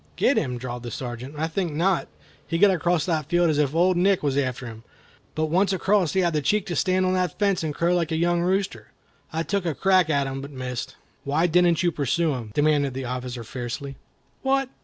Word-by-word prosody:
"Get 280 - +3
him!" 125 -5 -1
drawled 120 0 -6
the 120 - -6
Sergeant, 125 +3 -6
"I 155 - 0
think 165 0 -2
not. 175 +4 +1 0.4
He 165 - -1
got 200 +3 +6
across 175 -3 +1
that 155 -5 -1
field 175 0 +3
as 150 - 0
if 145 0 +1
Old 180 +2 +3
Nick 190 0 +2
was 140 -2 0
after 130 -2 -1
him. 110 -2 -9 0.5
But 155 - +1
once 195 +3 +2
across 190 -3 +2
he 190 - +2
had 170 -2 +1
the 150 - +1
cheek 205 +8 +1
to 175 -4 -4
stand 185 +3 +2
on 185 - +1
the 185 -1 +1
fence 200 +2 0
and 155 - -1
crow 170 +4 +1
like 170 -2 0
a - - +1
young 170 +1 +1
rooster. 190 +2 -1 0.4
I 160 +1 -1
took 200 +2 -1
a 165 -4 -2
crack 185 -2 +3
at 140 -2 +2
him, 135 0 -4
but 140 - -8
missed." 130 -3 -5 0.3
"Why 150 +5 +1
didn't 175 0 +3
you 175 - +3
pursue 155 +2 0
him?" 120 -4 -5
demanded 145 -3 +2
the 135 0 -4
officer, 125 -1 -5
fiercely. 125 +4 -6 0.5
"What! 270 0 +1
160 Hz, 225 wpm, -24 LUFS, 135-180 Hz, 0.5 s, got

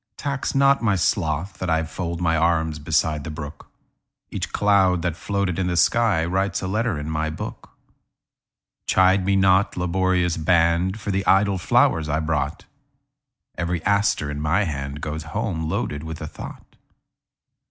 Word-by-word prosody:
Tax 140 -2 -3
not 140 0 +4
my 105 -4 +2
sloth 80 +2 -1
that 95 - -3
IFold 80 +1 -2
my 85 -2 +1
arms 80 -1 +1
beside 75 0 0
the - - -6
brook; 75 0 -8 0.6
Each - - -4
cloud 95 -4 +3
that 85 -3 -1
floated 100 -1 -2
in 90 - 0
the 90 - -1
skyWrites 95 -1 +1
a - - -2
letter 110 -1 -1
in 75 0 -5
my 80 0 -1
book. 80 - -7 1.2
Chide 95 +1 +4
me 100 +1 +1
not, 95 0 +3
laborious 90 -1 +1
band, 85 +4 +2
For 100 0 -3
the 95 0 0
idle 95 0 +3
flowers 80 -2 +2
I 80 +1 +1
brought; 75 -2 -2 0.9
Every 85 -1 -2
aster 100 -7 +1
in 75 0 -5
my 85 +7 +1
handGoes 75 +1 -4
home 80 -1 -3
loaded 75 -5 -2
with 80 0 -7
a 75 - -5
thought. - - -11
85 Hz, 150 wpm, -23 LUFS, 80-95 Hz, 1.2 s, not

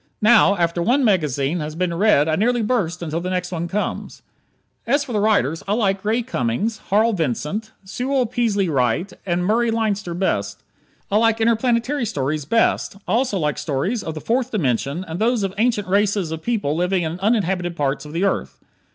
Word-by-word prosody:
Now, 215 -2 +6
after 170 0 0
one 255 +8 +2
magazine 155 - +1
has 155 0 -5
been 180 0 -1
read 170 -5 +3
I 155 - +2
nearly 235 +5 +1
burst 180 -7 -1
until 165 +1 -3
the 180 - -3
next 180 0 -2
one 170 -1 -3
comes. 205 +4 -4 0.6
As 280 +4 +2
for 245 - -7
the 210 - +1
writers, 200 -8 +1
I 200 - +1
like 200 -3 0
Ray 225 +3 +1
Cummings, 210 - -2
Harl 220 +3 +3
Vincent, 165 - -2
Sewell 250 +7 -1
Peaslee 220 -5 0
Wright, 140 - 0
and 175 0 0
Murray 230 +4 +2
Leinster 210 -6 -1
best. 100 - -2 0.5
I 205 - +3
like 225 0 +3
interplanetary 235 +3 +1
stories 150 -6 -2
best. 230 -1 +1
I - - -2
also 240 -3 +1
like 150 -4 -1
stories 170 - -1
of 160 - -5
the 155 - -6
Fourth 245 +2 0
Dimension 145 - -1
and 165 +2 -5
those 230 0 +1
of 195 -1 -2
ancient 225 -4 +1
races 200 -3 +1
of 160 0 -4
people 205 -9 -1
living 180 +1 0
in 165 +2 -4
uninhabited 190 -5 0
parts 140 -2 -1
of 150 - -10
the 170 +4 -1
earth. 195 - -1
195 Hz, 185 wpm, -21 LUFS, 165-225 Hz, 0.6 s, Now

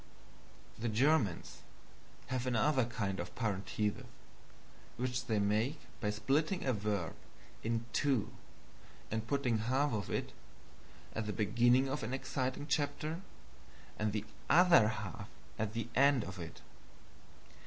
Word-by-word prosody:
The 120 +1 -1
Germans 115 - +2 0.7
have 130 -1 -1
another 130 +2 +3
kind 100 -5 -2
of 85 0 -5
parenthesis, 105 -2 -1 0.9
which 125 0 -2
they 110 -3 +1
make 110 +8 +1 0.2
by 105 - 0
splitting 140 - +1
a 130 - +2
verb 100 -5 -1 0.5
in 115 +1 -1
two 135 -7 +1 0.8
and 110 +1 -2
putting 125 -4 +1
half 130 +5 +1
of 105 -3 -2
it - - -2 0.8
at 110 -1 -2
the 105 - -2
beginning 120 +5 +4
of 135 +2 -2
an 125 +4 -2
exciting 130 +1 -2
chapter 150 +3 -1 0.8
and 105 0 +1
the 105 0 -2 0.2
OTHER 170 -9 +7
HALF 110 -5 -4 0.3
at 110 -1 -1
the 115 -1 -2
end 140 -2 +5
of 95 -1 -7
it. 85 - -8
115 Hz, 125 wpm, -34 LUFS, 105-135 Hz, 0.9 s, OTHER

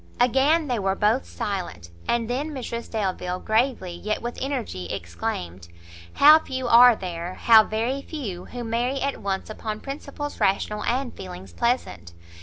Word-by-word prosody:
Again 270 +6 +3
they 245 -4 0
were 195 -1 0
both 215 +6 +1
silent; 175 - -5 0.2
and 235 -1 +1
then 265 +6 -2
Mrs 240 -5 -5
Delvile, 185 -4 -2
gravely, 220 -5 0
yet 215 +5 -3
with 240 +1 -5
energy 245 - -3
exclaimed, 85 +1 -5 0.5
"How 305 +2 +8
few 260 -4 -4
are 240 0 +8
there, 175 -2 -5
how 220 -2 +6
very 235 +6 -1
few, 220 - -6
who 245 -1 -7
marry 240 +4 -1
at 280 0 -2
once 195 -1 -2
upon 215 0 -5
principles 285 +2 -6
rational, 210 +2 +1
and 250 +1 -1
feelings 185 0 -9
pleasant! 235 - -1
225 Hz, 150 wpm, -24 LUFS, 190-260 Hz, 0.5 s, How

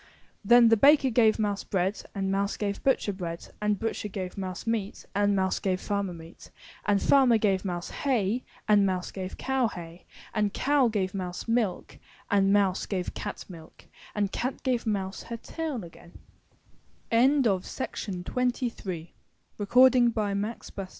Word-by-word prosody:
Then 235 +2 +7
the 225 - +5
baker 275 +1 +5
gave 220 -2 +4
mouse 205 -2 -1
bread, 190 +1 -1
and 195 -1 -1
mouse 200 +1 0
gave 200 -1 -3
butcher 260 -6 +1
bread, 170 -3 -6
and 210 -2 +1
but 225 - -2
cher 210 - -5
gave 185 -2 -5
mouse 185 -2 -5
meat, 225 -3 -3
and 205 0 +2
mouse 190 -1 +1
gave 185 -2 -1
farmer 200 -2 -2
meat, 165 0 -13 0.4
and 205 -1 +3
farmer 260 -2 +5
gave 195 -3 +1
mouse 175 -3 -4
hay, 245 -4 0 0.2
and 210 -2 +5
mouse 185 -2 -1
gave 185 -1 -6
cow 265 -2 +1
hay, 170 -3 -10 0.3
and 210 -2 0
cow 280 -2 +3
gave 195 -4 -1
mouse 180 0 -5
milk 225 -5 -1 0.3
and 195 -1 +4
mouse 200 -2 +2
gave 185 -3 -3
cat 205 - -6
milk 165 -4 -13 0.3
and 205 -2 0
cat 255 +2 -3
gave 245 -3 0
mouse 195 -2 -2
her 235 - -6
tail 295 - -5
again. 170 0 -14
205 Hz, 140 wpm, -27 LUFS, 190-225 Hz, 0.4 s, Then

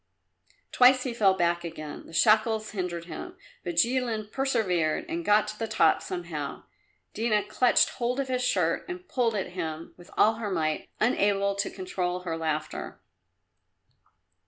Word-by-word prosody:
Twice 255 0 +6
he 255 - -3
fell 200 -5 +3
back 175 -1 +1
again; 155 -3 -7
the - - -13
shackles 215 +4 +3
hindered 180 -4 -4
him. 360 - -8 0.3
But 175 -2 -4
Jilin 230 +1 +1
persevered 205 - 0
and 335 +1 -3
got 210 -5 +4
to 215 - -8
the 225 - -2
top 220 - +3
somehow. 170 -6 -5 0.5
Dina 215 -2 +1
clutched 250 -1 +3
hold 245 +2 -2
of 275 - -1
his 255 -1 -1
shirt 180 -8 +1
and 365 0 -7
pulled 235 -4 0
at 195 - -2
him 165 -3 -5
with 175 0 -15
all 220 +1 +4
her 220 -3 -3
might, 155 -4 -1
unable 200 -3 +2
to 200 +1 -2
control 180 -1 -3
her 170 -3 -3
laughter. 155 -1 -3
205 Hz, 155 wpm, -27 LUFS, 175-235 Hz, 0.5 s, Twice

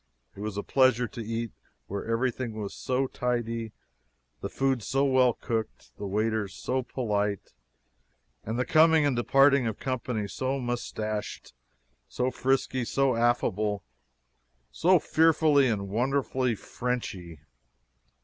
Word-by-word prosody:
It - - -12
was 105 -1 -4
a 100 - -2
pleasure 130 -3 +3
to 115 - -7
eat 115 0 -3 0.3
where 100 +1 -4
everything 120 +1 -1
was 100 -2 -5
so 130 +1 -1
tidy, 115 -3 -2 0.7
the - - -4
food 135 -2 0
so 135 +6 +1
well 130 -3 +4
cooked, 110 -2 -5
the 100 - -4
waiters 105 0 -1
so 130 +1 -1
polite, 105 -6 -2 0.9
and 110 +2 -3
the 125 - 0
coming 160 +1 +5
and 140 -3 +1
departing 135 0 +4
company 125 -5 -3
so 130 +7 -2
moustached, 110 - -4 0.5
so 125 +1 -1
frisky, 130 -1 0
so 135 +1 +1
affable, 110 -4 +1 0.9
so 185 +2 +4
fearfully 155 -3 +4
and 100 -4 -1
wonderfully 130 +2 0
Frenchy! 95 - -5
120 Hz, 120 wpm, -28 LUFS, 110-130 Hz, 0.9 s, coming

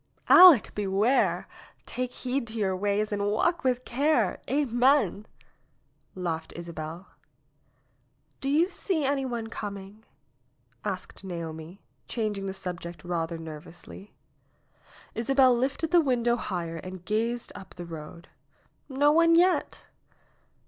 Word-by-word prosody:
"Aleck, 355 - +8
beware! 205 +5 +1 0.4
Take 250 0 -4
heed 255 0 -3
to 225 0 -6
your 195 -3 0
ways 205 +2 0
and 200 0 -1
walk 335 +12 +1
with 255 -1 0
care. 285 +6 +1
Amen 250 - +2 0.4
!" - - -42
laughed 160 -1 -3
Isabel. 170 +1 -7 1.3
"Do 275 - -3
you 330 +6 +3
see 325 -7 -1
any 275 0 0
one 235 -3 -3
coming?" 205 -1 -7 0.8
asked 195 -1 -5
Naomi, 170 0 -7 0.2
changing 210 -4 -3
the 190 - -3
subject 170 -3 -6
rather 170 -1 -2
nervously. 165 +5 -11 1.0
Isabel 260 +1 +3
lifted 275 +6 -1
the 350 -1 +6
window 240 -4 +1
higher 170 -7 -4
and 185 +1 -9
gazed 230 +3 -1
up 190 -1 -12
the 175 - -7
road. 165 +1 -9 0.6
"No 285 +2 +3
one 335 +1 +5
yet 360 +2 +2
215 Hz, 120 wpm, -27 LUFS, 180-265 Hz, 1.3 s, Aleck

